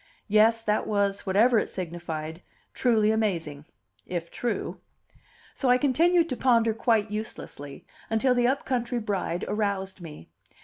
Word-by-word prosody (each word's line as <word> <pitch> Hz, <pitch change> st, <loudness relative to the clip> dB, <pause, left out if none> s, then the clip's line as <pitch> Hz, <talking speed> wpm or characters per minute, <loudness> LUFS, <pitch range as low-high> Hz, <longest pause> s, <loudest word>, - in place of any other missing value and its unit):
Yes, 225 Hz, +2 st, +4 dB
that 210 Hz, -1 st, 0 dB
was, 200 Hz, -1 st, 0 dB
whatever 220 Hz, +5 st, +4 dB
it -, -, -3 dB
signified, 165 Hz, -2 st, -5 dB, 0.3 s
truly 220 Hz, -4 st, +2 dB
amazing 165 Hz, -10 st, -2 dB, 0.4 s
if 170 Hz, -2 st, -4 dB
true. 240 Hz, -2 st, -3 dB, 0.7 s
So 265 Hz, -, -1 dB
I 250 Hz, -, +6 dB
continued 330 Hz, +6 st, +3 dB
to -, -, -2 dB
ponder 230 Hz, -3 st, +3 dB
quite 220 Hz, -2 st, +1 dB
uselessly, 145 Hz, -9 st, -7 dB, 0.2 s
until 235 Hz, +4 st, +2 dB
the 245 Hz, -1 st, +2 dB
up 270 Hz, +2 st, 0 dB
country 245 Hz, -1 st, -1 dB
bride 195 Hz, -5 st, -2 dB
aroused 200 Hz, -3 st, -2 dB
me. 150 Hz, -, -10 dB
215 Hz, 135 wpm, -26 LUFS, 185-240 Hz, 0.7 s, I